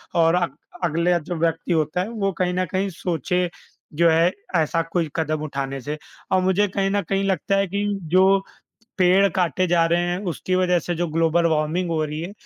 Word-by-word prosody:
और 165 0 +4
अग 175 -1 -1 0.3
अगला 170 +1 +2
जो 175 +3 -5
व्यक्ति 165 +1 -1
होता 155 +2 0
है 200 - -3
वो 200 -4 -1
कहीं 180 -1 0
न 185 0 0
कहीं 195 +1 0
सोचे 180 +1 -1 0.5
जो 170 +1 +4
है, 165 +3 +4 0.2
ऐसा 165 +1 +2
कोई 165 -4 0
कदम 155 -2 -1
उठाने 135 -2 -4
से। 150 +4 -4 0.3
और 185 - +3
मुझे 190 +2 +2
कहीं 195 0 -1
न 205 0 +1
कहीं 195 0 +1
लगता 195 0 0
है 195 -1 +1
कि 200 +3 -2 0.3
जो 190 +1 +5 0.6
पेड़ 190 +2 +5
काटे 185 0 0
जा 170 -1 +3
रहे 170 +1 +2
हैं, 175 +1 -1
उसकी 180 +2 -2
वज़ह 180 -1 +3
से 175 +1 -3
जो 175 +1 -1
ग्लोबल 165 +1 +2
वार्मिंग 160 +3 0
हो 155 -1 0
रही 150 +1 -4
है, 175 +4 -6
175 Hz, 200 wpm, -22 LUFS, 165-185 Hz, 0.6 s, जो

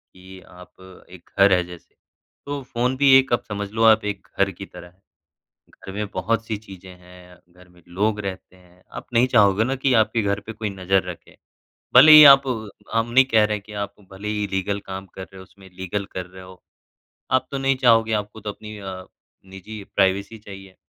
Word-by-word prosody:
कि 95 +1 -14
आप 90 +1 -17 0.3
एक 90 -1 -16
घर 100 0 +5
है 90 -1 +2
जैसे, 90 -1 -14 0.5
तो 145 0 -5
फ़ोन 125 +1 -2
भी 140 0 +3
एक 135 0 -3
आप 120 - 0
समझ 105 -1 -5
लो 110 +1 -1
आप 110 -1 +5
एक 105 -1 -5
घर 100 0 +2
की 95 +2 -10
तरह 90 -2 -13
है, 90 +2 -25 0.7
घर 95 - -12
में 105 +2 -4
बहुत-सी 110 +3 -2
चीज़ें 95 -3 -13
हैं, 90 0 -17
घर 90 +1 -20
में 90 0 -23
लोग 105 +4 -1
रहते 95 -2 -8
हैं, 90 0 -24
आप - - -9
नहीं 120 +2 +4
चाहोगे 105 -1 +4
ना 130 +3 -2
कि 135 0 0
आपके 110 +1 0
घर 100 0 -1
पे 110 - -9
कोई 110 -1 -5
नज़र 95 0 0
रखे। 85 - -13 0.6
भले 145 +5 +9
ही 155 0 +11
आप 135 0 +3 0.5
हम 115 +1 -1
नहीं 130 +3 +5
कह 110 -5 +2
रहे 105 0 -1
हैं 105 - -10
कि 110 - -12
आप 100 0 -12 0.2
भले 100 +2 -8
ही 105 -1 -2
लीगल 100 +1 -2
काम 95 0 -7
कर 95 - -8
रहे 95 +1 -13
हो, - - -11
उसमें 95 0 -18
लीगल 95 +2 -5
कर 90 -1 -6
रहे 95 +1 -14
हो, 95 0 -15 0.7
आप 130 0 +1
तो 140 - -3
नहीं 135 0 0
चाहोगे, 115 -3 +3
आपको 105 +1 -4
तो 105 0 -7
अपनी 105 +1 -11
अ, 95 -2 -8 0.4
निजी 95 +2 -10
प्राइवेसी 100 +3 0
चाहिए। 95 -2 -13
100 Hz, 210 wpm, -22 LUFS, 95-110 Hz, 0.7 s, ही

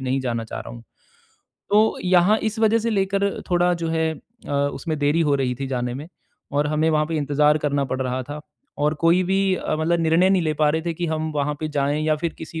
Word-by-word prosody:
नहीं 130 +1 -1
जाना 120 -3 -2
चाह 110 - -7
रहा - - -8
हूँ। 120 - -11 0.9
तो 215 +2 +3
यहाँ 185 +4 +4
इस 220 - -9
वजह 225 0 +4
से 230 +1 -1
लेकर 195 -1 0
थोड़ा 175 0 +3
जो - - -1
है 160 0 0 0.4
अ, - - -3
उसमें 145 +3 -1
देरी 145 +3 +2
हो 150 -3 +2
रही 130 -2 -1
थी 135 - -2
जाने 125 -2 -2
में 145 +5 -7 0.4
और 145 +1 +1
हमें 155 +2 +1
वहाँ 155 -1 +2
पे 165 0 -3
इंतज़ार 150 +1 +2
करना 145 -2 0
पड़ 130 0 -3
रहा 130 0 -2
था 145 +3 -7 0.4
और 150 +1 +1
कोई 170 +2 +5
भी 190 +1 +1
अ, 155 - -2
मतलब 165 +2 +1
निर्णय 165 +3 +3
नहीं 190 -2 +3
ले 155 -1 0
पा 150 0 +2
रहे 160 +1 -1
थे 170 0 -3
कि 175 +1 -3
हम 160 0 -2
वहाँ 150 0 -1
पे 155 - -2
जाएँ। 145 0 0
या 155 0 +2
फ़िर 165 +2 -3
किसी 160 0 -7
155 Hz, 240 wpm, -22 LUFS, 145-175 Hz, 0.9 s, कोई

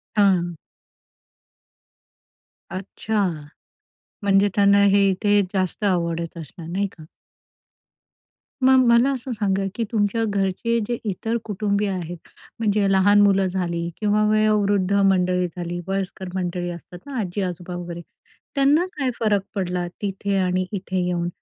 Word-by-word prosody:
हां. 185 -5 +3 2.2
अच्छा, 200 +2 -2 1.0
म्हणजे 200 0 +4
त्यांना 200 0 +5
हे 200 0 +4
इथे 205 +2 +2
जास्त 190 +1 -1
आवडत 170 -3 -1
असणार, 160 +1 -9
नाही 195 +3 0
का? 155 - -11 1.6
मग 260 0 +6
मला 235 +4 +5
असं 260 -1 -4
सांगा, 200 -3 0
की 230 - -1
तुमच्या 220 +1 +1
घरचे 200 +3 0
जे 240 - -1
इतर 225 +5 -2
कुटुंबीय 205 0 0
आहेत, 175 -2 -4 0.4
म्हणजे 210 -2 +2
लहान 205 +2 +5
मुलं 195 -1 +4
झाली 170 -2 -2
किंवा 210 0 +2
वयोवृद्ध 205 -3 +2
मंडळी 185 -2 +3
झाली, 175 0 -5
वयस्कर 195 -1 -3
मंडळी 175 -1 -2
असतात 175 +1 -10
ना, 275 -3 -6
आजी-आजोबा 180 -3 -3
वगैरे, 175 -1 -6 0.5
त्यांना 290 +6 +3
काय 270 -3 0
फरक 210 -3 +2
पडला 180 -2 -2 0.2
तिथे 200 0 -1
आणि 185 0 +1
इथे 190 -2 -3
येऊन? 175 -1 -1
195 Hz, 125 wpm, -23 LUFS, 180-210 Hz, 2.2 s, मग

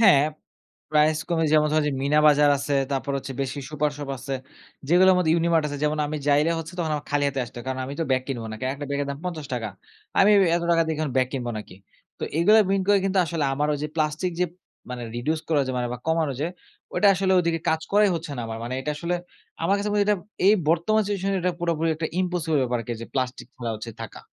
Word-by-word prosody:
হ্যাঁ, 185 -11 +7 0.7
প্রাইস 155 0 +3
কমে 165 -1 +2
যেমন 150 -1 +4
ধরেন 155 -1 +2
যে 145 - -1
মিনা 145 +2 +3
বাজার 145 -1 +6
আছে, 140 +1 -1 0.2
তারপর 140 +1 -2
হচ্ছে 135 - -6
বেশি 135 +1 -3
সুপার 150 0 0
শপ 145 - -6
আছে। 135 +2 -4 0.5
যেগুলার 185 +3 +6
মধ্যে 160 -3 +2
ইউনিমার্ট 165 -2 +2
আছে। 145 - -4
যেমন 150 +1 0
আমি 155 - -3
যাইলে 150 +3 +4
হচ্ছে 165 +2 -7
তখন 160 -3 -1
আমার 145 - -7
খালি 145 0 +1
হাতে 135 -1 -2
আসতে 120 - -14
হয়। 120 - -8
কারণ 130 0 -2
আমি 140 - -6
তো - - +1
ব্যাগ 130 -1 +2
কিনবো 120 -4 -3
নাকি। 110 +4 -6
একটা 145 +1 -6
ব্যাগের 140 0 -1
দাম 140 - -5
৳৫০। 140 - -4 0.5
আমি 200 - +6 0.3
এত 170 - -2
টাকা 165 -1 +4
দিয়ে 160 -1 -1 0.2
ব্যাগ 130 -1 +3
কিনবো 125 -3 -3
নাকি? 105 -3 -10 0.4
তো - - -9 0.2
এগুলা 210 +6 +6
মিন 195 - +2
করে 205 -1 +6
কিন্তু 195 0 +1
আসলে 160 -1 -1
আমার 150 +2 0
ঐযে 150 +1 -3
প্লাস্টিক 155 +3 0
যে - - +4 0.5
মানে 125 -1 -5
reduce 155 +6 -1
করা 155 - +2
ঐযে 130 - -3
মানে 120 -1 -1
বা 125 - -5
কমানো 160 -3 +1
যে 155 - +1 0.5
ওইটা 205 - +4
আসলে 190 0 +1
ওদিকে 165 -1 0
কাজ 160 0 +2
করাই 205 0 +5
হচ্ছে 165 -2 -5
না - - -3
আমার 115 0 -5
মানে 120 +2 -4
এটা 150 - -3
আসলে 170 +3 -2 0.5
আমার 195 - +3
কাছে 205 +1 -2
মনে 205 - +1
হয় 205 - +1
যে - - +5
এইটা - - -4 0.3
এই 205 - +7
বর্তমান 170 +7 +3
সিচুয়েশনে 195 -1 -1
এটা 180 0 +1
পুরোপুরি 165 -1 0
একটা 160 0 -2
ইম্পসিবল 175 -4 0
ব্যাপারকে 120 -1 -2
যে 115 - -6
প্লাস্টিক 130 -1 -2
ফেলা 120 -2 -4
হচ্ছে 110 +2 -7
থাকা। - - -8
155 Hz, 230 wpm, -25 LUFS, 135-170 Hz, 0.7 s, হ্যাঁ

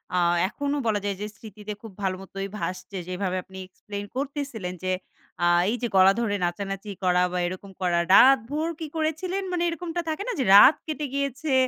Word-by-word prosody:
আ 180 - +3 0.3
এখনও 285 +4 -2
বলা 210 -2 +2
যায় 200 - -1
যে - - -2
স্মৃতিতে 210 0 -8
খুব 225 -3 -10
ভাল 190 -1 0
মতই 195 0 -6
ভাসছে। 190 +1 -5
যেভাবে 185 0 -2
আপনি 190 +1 -13
এক্সপ্লেইন 205 +2 -8
করতেছিলেন 270 -9 -4
যে 185 - 0 0.5
আ - - +4 0.2
এইযে 240 0 -2
গলা 190 +1 +7
ধরে 210 -3 0
নাচানাচি 195 +3 -4
করা 180 0 +3
বা 180 - -1
এরকম 185 +2 -7
করা। 175 -2 +2
রাতভর 270 +6 +5
কি 320 - -4
করেছিলেন 325 +5 -1
মানে 350 -1 0
এরকমটা 335 +1 -3
থাকে 315 +5 -2
না - - 0
যে, - - +2
রাত 260 +9 +9
কেটে 305 -1 -3
গিয়েছে। 280 +1 -2
215 Hz, 180 wpm, -25 LUFS, 190-290 Hz, 0.5 s, রাত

